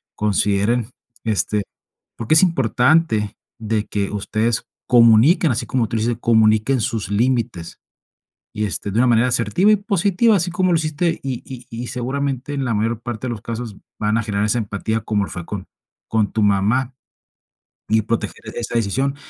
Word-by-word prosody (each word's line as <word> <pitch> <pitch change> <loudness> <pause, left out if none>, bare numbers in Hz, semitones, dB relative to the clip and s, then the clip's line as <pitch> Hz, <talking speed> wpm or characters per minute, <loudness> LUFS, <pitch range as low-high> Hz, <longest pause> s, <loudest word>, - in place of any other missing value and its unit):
consideren. 105 +3 +1 0.3
Este, 105 -1 0 0.5
porque 115 +5 0
es 160 - +7
importante 125 - +2 0.2
de 110 -1 -1
que 100 -1 -2
ustedes 110 +3 -1 0.2
comuniquen, 120 - +5
así 120 - -2
como 120 -4 0
tú - - -4
dices, 115 +1 0
comuniquen 110 +2 +3
sus 110 -3 -2
límites 115 -5 -1 0.8
y, 105 - -1
este, 100 0 -2
de 105 - -1
una 125 - +4
manera 120 +1 +3
asertiva 120 - +2
y - - +5
positiva, 200 +2 +2
así 175 0 0
como 185 +1 +1
lo - - +4
hiciste. 160 +2 -1
Y 130 -3 -4
y 125 -2 -9
y 120 +1 -6
seguramente, 135 +2 -3
en 140 -1 -2
la 115 - 0
mayor 110 +2 -1
parte 120 +1 -5
de - - -2
los 110 - -6
casos 115 -2 -6 0.2
van 105 +1 +1
a - - 0
generar 105 -1 -1
esa 115 +3 +1
empatía 110 +1 -2
como 105 -2 -1
lo - - -8
fue 90 -1 -7
con 100 -2 -6 0.4
con 110 -3 +1
tu 110 - 0
mamá, 105 +6 +1 1.0
y 110 0 +3
proteger 115 +1 -3
esa 120 0 -4
decisión. 130 +5 0
115 Hz, 170 wpm, -20 LUFS, 105-130 Hz, 1.0 s, es